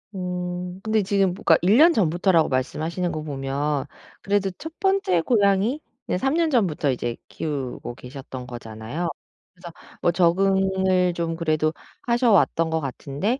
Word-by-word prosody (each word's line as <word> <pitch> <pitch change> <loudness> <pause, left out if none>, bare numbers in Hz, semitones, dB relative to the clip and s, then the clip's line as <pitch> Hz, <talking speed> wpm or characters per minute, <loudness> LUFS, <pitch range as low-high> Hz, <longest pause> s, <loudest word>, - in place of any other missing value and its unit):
음 180 0 -4
근데 220 0 +1
지금 195 -1 +1
뭐 - - -11
그니까 160 - +6
1 195 +6 +4
년 335 +4 +7
전부터라고 175 - +2
말씀하시는 160 +7 -1
거 155 - -4
보면 140 0 -2 0.4
그래도 200 -1 +1
1 320 +1 -8
번째 385 - +2
고양이는 205 - +2 0.4
3 270 +5 +1
년 330 0 +2
전부터 180 - +1
이제 120 -2 -3
키우고 135 -5 -5
계셨던 130 0 -9
거잖아요. 120 +7 -5 0.4
그래서 175 -2 -11 0.3
뭐 175 - +3
적응을 190 +1 +2
좀 170 -1 -2
그래도 155 -1 0 0.3
하셔 240 0 +2
왔던 165 -4 +3
것 160 0 0
같은데 145 - -3
175 Hz, 300 characters per minute, -23 LUFS, 150-195 Hz, 0.4 s, 년